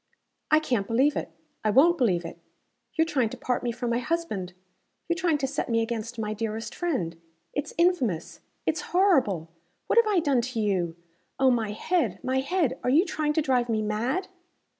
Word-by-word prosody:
"I 310 - +6
CAN'T 245 -10 -1
believe 265 +6 +3
it! - - -3 0.3
I 215 - +2
won't 320 +10 +5
believe 180 -9 +2
it! 170 0 -8 0.6
You're 320 - +3
trying 260 -8 +1
to - - -8
part 250 - -1
me 240 - -1
from 240 0 -3
my 235 - +1
husband 245 - -2 0.5
you're 340 - +1
trying 340 -4 +1
to 275 - -1
set 275 0 -3
me 230 -1 +2
against 230 0 -4
my 215 -1 -2
dearest 220 +1 -4
friend. 175 - -2 0.3
It's 290 - -4
infamous. 270 - +1 0.3
It's - - 0
horrible. 260 - +2 0.3
What - - +4
have 465 - +4
I 415 -3 +2
done 280 -6 +2
to 240 -1 -4
you? 185 -6 0 0.4
Oh, 265 -1 +4
my 230 -3 0
head! 330 - 0
my 260 +1 +1
head! 305 +1 0
Are - - +1
you 310 +8 +5
trying 310 -5 -1
to 315 - +1
drive 250 -3 +1
me 220 -1 +1
mad?" 235 - -1
250 Hz, 190 wpm, -27 LUFS, 215-315 Hz, 0.6 s, I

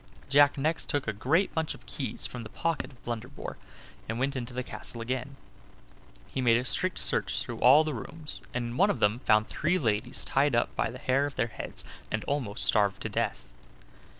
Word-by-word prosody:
Jack 145 +1 +6
next 155 +4 -1
took 145 -4 0
a 110 - 0
great 155 - +1
bunch 160 -2 -1
of - - -17
keys - - -3
from 125 - -5
the 110 - -8
pocket 165 -1 -2
of 125 - -20
Blunderbore, 120 +3 -5 0.5
and 115 - -2
went 135 +3 0
into 125 -1 -4
the 125 +1 -3
castle 120 - -4
again. 130 +3 -3 0.9
He 130 - -3
made 115 -2 +5
a 125 - -2
strict 185 +7 0
search - - +1
through - - -6
all 140 +5 +7
the 155 -1 -2
rooms, 150 +7 -5
and 125 -1 -2
in 120 - -6
one 200 +5 +5
of 200 - 0
them 105 +3 +3
found 110 -3 +3
three 175 +4 +1
ladies 120 -2 -1
tied 140 -1 +2
up 120 - +1
by - - +1
the 125 - -9
hair 135 +2 +2
of 145 - -8
their - - +1
heads, - - -5 0.3
and 110 -1 -1
almost 130 -8 +1
starved 100 -3 +3
to - - -2
death. - - -2
130 Hz, 205 wpm, -29 LUFS, 115-145 Hz, 0.9 s, all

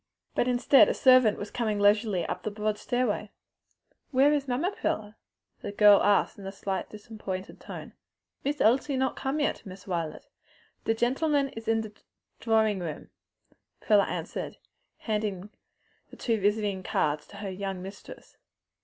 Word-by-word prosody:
But 245 - +1
instead 250 +2 +5
a - - 0
servant 255 -5 +5
was 205 - -6
coming 220 -4 -1
leisurely 205 -3 +3
up - - -4
the - - -3
broad 210 0 -2
stairway. 245 -4 -1 0.8
"Where 280 +2 +4
is 285 -2 -1
mamma, 275 +10 0
Prilla?" 215 - -3 0.5
the - - -6
young 200 - -6
girl 205 -1 +7
asked 205 0 +2
in 195 - -8
a - - -4
slightly 195 +1 -4
disappointed 205 -4 -7
tone. - - -9 0.5
"Miss 290 +2 -1
Elsie 265 +5 +3
not 265 0 0
come 270 +3 -2
yet, 290 - -1
Miss 190 0 -11
Wilet. 170 -4 -3 0.6
De 225 - +2
gentlemen 275 +4 +1
is 225 -3 -10
in 225 0 +2
de 220 -1 -7 0.5
drawin' 220 -3 +2
room," 160 -4 -6 0.7
Prilla 205 -2 +3
answered, - - -5 0.4
handing 210 -3 -3 0.7
two 230 -3 0
visiting 205 -1 0
cards 150 -4 -1
to - - -14
her 200 -1 -5
young 190 -1 -5
mistress. 195 +2 -11
215 Hz, 155 wpm, -28 LUFS, 200-250 Hz, 0.8 s, girl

